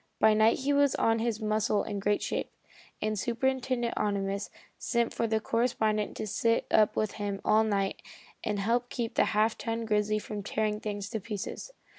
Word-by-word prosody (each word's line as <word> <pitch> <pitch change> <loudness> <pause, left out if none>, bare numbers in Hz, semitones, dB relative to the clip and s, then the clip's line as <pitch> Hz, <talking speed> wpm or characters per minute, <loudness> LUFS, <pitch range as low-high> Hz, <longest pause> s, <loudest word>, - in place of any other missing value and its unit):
By 220 0 +6
night 220 +1 +4
he 285 +2 +1
was 285 -1 +3
on 225 0 +2
his 225 -1 -1
muscle 215 -1 +1
in 200 - -4
great 205 +1 +1
shape, - - -2 0.5
and 215 -1 0
Superintendent 250 +1 0
Ohnimus 200 -1 -1 0.3
sent 235 -1 0
for 230 - 0
the 220 0 +1
correspondent 220 -2 0
to - - -3
sit 230 +2 +1
up 215 -1 +4
with 215 -1 0
him 200 -1 -2
all 220 +1 +5
night 200 -3 -1 0.4
and 210 -1 -1
help 235 +5 0
keep 230 -2 -3
the - - +3
half 215 +1 +1
ton 230 0 -2
grizzly 210 0 +1
from 210 0 -5
tearing 210 +1 -1
things 205 -2 -4
to 220 - -2
pieces. 210 - -5
215 Hz, 180 wpm, -29 LUFS, 210-230 Hz, 0.5 s, By